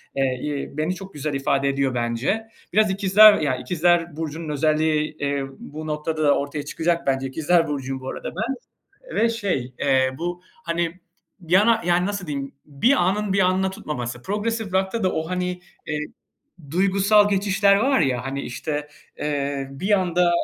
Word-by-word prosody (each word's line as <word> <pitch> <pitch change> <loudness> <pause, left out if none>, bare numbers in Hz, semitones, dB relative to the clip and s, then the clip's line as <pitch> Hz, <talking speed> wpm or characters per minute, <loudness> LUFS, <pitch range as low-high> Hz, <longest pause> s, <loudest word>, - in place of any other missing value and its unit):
eee, 130 -2 0
iii, 145 -1 -4
beni 160 +4 0
çok 195 +1 -10
güzel 150 0 -3
ifade 135 0 +1
ediyor, 135 -2 0
bence. 120 - -1 0.3
Biraz 215 0 +4
İkizler 200 +2 +7
ya, 145 -4 0
İkizler 170 +4 +1
burcunun 160 0 -5
özelliği, 155 +1 +1
iii, 140 -1 -1
bu 155 +2 -8
noktada 150 -1 +1
ortaya 145 +1 -4
çıkacak, 170 0 -1
bence. 135 0 +1
İkizler 160 +4 +2
burcuyum 135 -2 -4
bu 130 - -5
arada - - -5
ben 225 +8 -2 0.6
ve 230 - +4
şey, 185 - -2
eee, 130 -1 +3
bu, 175 +1 -4 0.2
hani, 170 +1 -2 0.5
yana 210 +6 +4
yani, 180 +1 +3
nasıl 200 -2 -3
diyeyim, 140 -2 -4
bir 150 - +2 0.2
anın 205 +1 0
bir 195 - +2
anına 185 +1 +2
tutmaması, 120 -9 -5
progresif 210 - -2
rock'ta 190 +4 0
da 185 - +2
o, 160 0 -2
hani, 180 0 -2 0.3
eee, 150 -1 -2 0.7
duygusal 195 +3 +4
geçişler 200 0 +3
var 265 +4 +2
ya, 125 -5 0
hani, 135 +1 -3
işte, 150 +3 -4 0.3
eee, 140 -2 -2
bir 185 +10 -2
anda, 180 -1 +2
160 Hz, 160 wpm, -23 LUFS, 140-190 Hz, 0.7 s, İkizler